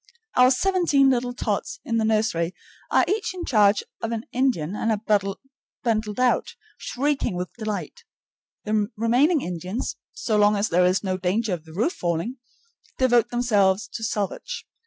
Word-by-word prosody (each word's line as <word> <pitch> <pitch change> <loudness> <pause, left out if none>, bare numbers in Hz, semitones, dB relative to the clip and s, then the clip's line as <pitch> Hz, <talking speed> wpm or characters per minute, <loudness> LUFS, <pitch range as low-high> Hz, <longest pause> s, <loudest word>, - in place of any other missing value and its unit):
Our 250 0 +6
seventeen 290 -2 +3
little 245 -1 -1
tots 220 +3 -2
in 230 - 0
the 225 - +1
nursery 215 -6 +1 0.3
are - - +4
each 405 0 -1
in 355 - -5
charge 210 -4 +4 0.2
of 225 - -2
an 230 0 -3
Indian, 240 - 0
and 225 - -1
are 210 -1 +2 0.6
bundled 215 -2 -1
out, 250 -1 +1 0.2
shrieking 280 -6 -1
with 180 0 -4
delight. 215 - -5 0.6
The 210 -1 +1
remaining 260 +8 +3
Indians, 180 +5 -4 0.2
so 215 -2 -1
long 210 0 +4
as 205 +1 0
there 180 +2 +3
is 185 +1 +1
no 185 -1 -1
danger 195 +3 0
of 165 -2 -5
the 160 - -13
roof 230 - 0
falling, 175 +9 -2 0.6
devote 245 -3 +3
themselves 205 -5 +2
to 225 - -6
salvage. 220 - -3
220 Hz, 155 wpm, -24 LUFS, 195-250 Hz, 0.6 s, Our